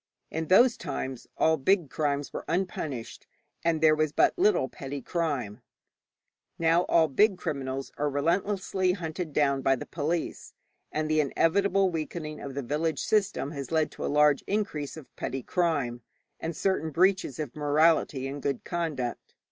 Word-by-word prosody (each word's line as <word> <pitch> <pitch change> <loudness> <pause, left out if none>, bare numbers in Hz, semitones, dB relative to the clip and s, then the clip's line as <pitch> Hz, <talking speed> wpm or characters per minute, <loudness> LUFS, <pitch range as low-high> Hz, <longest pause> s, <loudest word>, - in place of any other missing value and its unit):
In 160 0 -3
those 235 +6 +6
times 135 -5 -5
all 160 0 +3
big 170 +1 +2
crimes 145 -2 -1
were - - -4
unpunished, 155 -9 -3 0.4
and 165 -2 +1
there 155 -1 +6
was 155 -1 +1
but - - +3
little 405 +3 +3
petty 140 +1 -6
crime. 135 - -2 1.0
Now 165 +2 +3
all 165 -1 +4
big 195 +7 +3
criminals 135 -4 -4
are 145 0 +1
relentlessly 185 +5 0
hunted 170 -2 -4
down 140 -2 +2
by 135 0 +3
the - - -7
police; 165 +2 -3 0.4
and 155 0 -1
the 155 0 +2
inevitable 195 +6 +2
weakening 155 -1 -4
of 135 -1 -7
the 140 - -3
village 150 +3 -1
system 210 -8 +1
has 140 -2 -6
led 160 -1 +1
to - - -7
a - - 0
large 150 -1 +4
increase 180 -9 -2
of 155 - -13
petty 135 0 -4
crime, 145 -10 0 0.4
and 165 0 -4
certain 190 -5 0
breaches 180 -3 +2
of 150 -5 -5
morality 150 -2 +2
and 140 +1 -6
good 140 -2 -2
conduct. 155 -9 -3
155 Hz, 155 wpm, -28 LUFS, 140-175 Hz, 1.0 s, those